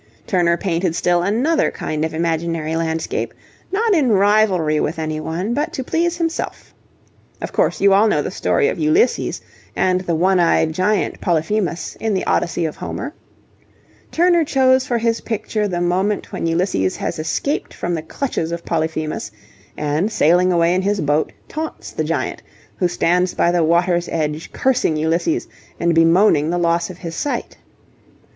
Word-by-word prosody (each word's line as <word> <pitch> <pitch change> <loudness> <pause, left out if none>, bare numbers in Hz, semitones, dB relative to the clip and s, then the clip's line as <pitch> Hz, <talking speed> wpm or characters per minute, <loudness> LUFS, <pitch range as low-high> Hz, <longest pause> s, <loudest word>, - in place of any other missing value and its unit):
Turner 175 -3 +2
painted 175 -2 -1
still 175 0 +2
another 245 - +1
kind 155 0 -3
of 160 0 -2
imaginary 165 -1 -1
landscape, 165 0 -2 0.4
not 430 +3 +2
in 295 -8 +3
rivalry 200 -6 +3
with 155 - -1
any 155 -1 -3
one, 175 +8 -3
but 300 +5 -1
to 265 - -3
please 340 +5 0
himself. 330 -1 -3 0.7
Of - - -5
course - - +1
you 200 0 +5
all 205 +3 +5
know 210 - +1
the - - -4
story 440 - +1
of - - -2
Ulysses 320 +8 +1 0.3
and 185 -1 +1
the 175 -3 -1
one 185 +3 +3
eyed 165 -2 +3
giant, 190 +5 0
Polyphemus, 175 +1 -1
in 220 -2 0
the 185 - -1
Odyssey 170 0 0
of 155 - -4
Homer? 280 +5 -5 1.0
Turner 345 0 +3
chose 260 -2 +3
for 240 - +1
his 230 0 0
picture 215 -1 -2
the 175 -3 -2
moment 190 +4 0
when - - -2
Ulysses 165 - 0
has - - -4
escaped 280 - -2
from 175 - -3
the 165 - -2
clutches 165 - -3
of 170 0 -5
Polyphemus, 155 -6 -2 0.5
and 150 +8 0
sailing 180 +1 +3
away 170 0 +3
in 185 - +1
his 200 +1 0
boat, 150 0 +1 0.2
taunts 315 +1 -6
the - - -2
giant, - - -2 0.4
who 180 - +2
stands 180 +1 +1
by 170 - +3
the 175 -1 +2
water's 175 +1 +2
edge, 155 0 -3
cursing 250 -12 +1
Ulysses 170 - 0 0.3
and 170 0 +2
bemoaning 165 -1 +4
the 175 - 0
loss 170 0 +1
of 180 - -9
his 170 -3 -7
sight. 285 - -3
175 Hz, 165 wpm, -19 LUFS, 165-220 Hz, 1.0 s, you